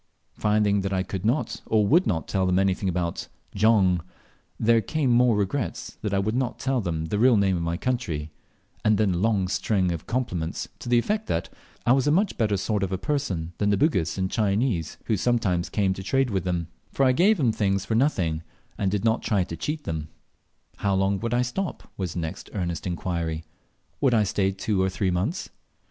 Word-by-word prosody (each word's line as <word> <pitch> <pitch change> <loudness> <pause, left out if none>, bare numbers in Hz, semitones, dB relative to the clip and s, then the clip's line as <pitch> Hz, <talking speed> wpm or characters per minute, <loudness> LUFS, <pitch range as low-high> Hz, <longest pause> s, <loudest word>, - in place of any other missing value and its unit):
Finding 105 -1 +2
that 95 0 -2
I 95 -1 +1
could 95 -1 -5
not 120 +8 0
or 110 -2 +3
would 170 - +4
not 80 -6 -1
tell 95 -2 0
them 90 0 +2
anything 95 0 +1
about 85 -1 -2 0.3
"Jong," 100 -4 +3 0.6
there 115 0 +4
came 140 +4 0
more 120 -2 +4
regrets 120 +4 -3
that 105 - -2
I 100 - +1
would 100 +3 0
not 125 0 -1
tell 130 -2 0
them 80 -4 -2
the 100 +6 -2
real 125 0 +5
name 95 -2 +3
of 85 - -2
my 85 0 -1
country; 85 -12 -2 0.5
and 110 -1 +4
then 105 -3 +2
a - - -1
long 100 -1 +1
string 95 -1 +1
of 85 -2 -5
compliments, 90 -10 -2
to - - -7
the 120 - +4
effect 210 - 0
that 85 - -1 0.4
I 120 - +4
was 135 +2 +3
a - - +4
much 195 +5 +2
better 105 -4 +1
sort 105 +1 -1
of 95 -1 -1
a 95 - 0
person 95 - -2
than 105 - +2
the 100 - +3
Bugis 95 - +1
and 95 0 -1
Chinese, 105 - 0
who 110 - +1
sometimes 100 -5 +1
came 100 -3 +1
to 95 - -7
trade 130 +5 +1
with 95 -3 -1
them, 85 -2 -1 0.2
for 135 - +2
I 130 - +5
gave 190 +11 +4
them 130 -8 +2
things 95 -3 0
for - - -2
nothing, 95 - +1 0.4
and 100 - +1
did 105 +2 -1
not 110 0 +2
try 100 -4 +1
to 85 - -6
cheat 150 - -3
them. 80 -2 -4 0.7
How 100 -1 +1
long 95 +1 +1
would 115 +2 -1
I 125 - +3
stop? 170 +10 -4
was 90 -4 -3
the 85 - -1
next 80 -1 -6
earnest 85 -2 -2
inquiry. 85 -2 -2 0.6
Would 130 -4 +3
I 110 - +4
stay 95 0 +1
two 95 0 -1
or 95 - +2
three 95 0 -1
months? 100 - -2
100 Hz, 215 wpm, -25 LUFS, 90-120 Hz, 0.7 s, real